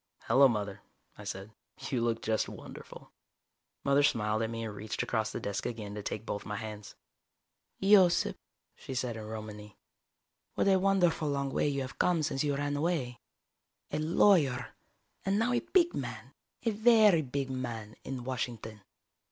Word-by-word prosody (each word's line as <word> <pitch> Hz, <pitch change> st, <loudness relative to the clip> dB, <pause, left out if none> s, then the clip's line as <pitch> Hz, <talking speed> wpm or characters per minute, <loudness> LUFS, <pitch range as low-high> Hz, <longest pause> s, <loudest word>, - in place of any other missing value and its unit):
"Hello, 135 Hz, +1 st, +6 dB
Mother," 105 Hz, -5 st, -3 dB, 0.3 s
I 105 Hz, -, -11 dB
said. 100 Hz, +1 st, -6 dB, 0.4 s
"You 125 Hz, -3 st, +1 dB
look 115 Hz, -1 st, 0 dB
just 110 Hz, 0 st, 0 dB
wonderful." -, -, -11 dB, 0.7 s
Mother 140 Hz, +1 st, +4 dB
smiled 110 Hz, -5 st, +2 dB
at 110 Hz, -, -1 dB
me 115 Hz, 0 st, -4 dB
and 110 Hz, -2 st, -4 dB
reached 105 Hz, +1 st, -3 dB
across 110 Hz, -2 st, -1 dB
the -, -, -4 dB
desk 100 Hz, 0 st, -3 dB
again 105 Hz, -4 st, -5 dB
to 105 Hz, -, -5 dB
take 105 Hz, +1 st, -5 dB
both 105 Hz, -, -3 dB
my 105 Hz, -, -5 dB
hands. 105 Hz, -1 st, -7 dB, 0.8 s
"Yosip," 190 Hz, -3 st, +5 dB, 0.4 s
she 130 Hz, -, -8 dB
said 125 Hz, -2 st, -1 dB
in 110 Hz, -, -6 dB
Romany. 105 Hz, -2 st, -8 dB, 0.8 s
"What -, -, +1 dB
a 190 Hz, -1 st, +5 dB
wonderful 180 Hz, -5 st, +2 dB
long 140 Hz, -1 st, -1 dB
way -, -, +2 dB
you 140 Hz, -1 st, -1 dB
have 130 Hz, 0 st, -7 dB
come 170 Hz, -3 st, +2 dB
since 140 Hz, -2 st, 0 dB
you 145 Hz, -1 st, +1 dB
ran 145 Hz, +1 st, -1 dB
away. 145 Hz, -6 st, -1 dB, 0.7 s
A -, -, -1 dB
lawyer, 155 Hz, -, +3 dB, 0.5 s
and 195 Hz, +1 st, +1 dB
now 235 Hz, +3 st, +2 dB
a 240 Hz, -, +3 dB
big 345 Hz, -2 st, +2 dB
man, -, -, -6 dB, 0.3 s
a 230 Hz, -, +2 dB
very 215 Hz, -5 st, +5 dB
big 135 Hz, -1 st, -3 dB
man, 115 Hz, -4 st, -5 dB
in 130 Hz, -2 st, -5 dB
Washington. 115 Hz, -4 st, -4 dB
130 Hz, 165 wpm, -31 LUFS, 110-160 Hz, 0.8 s, Hello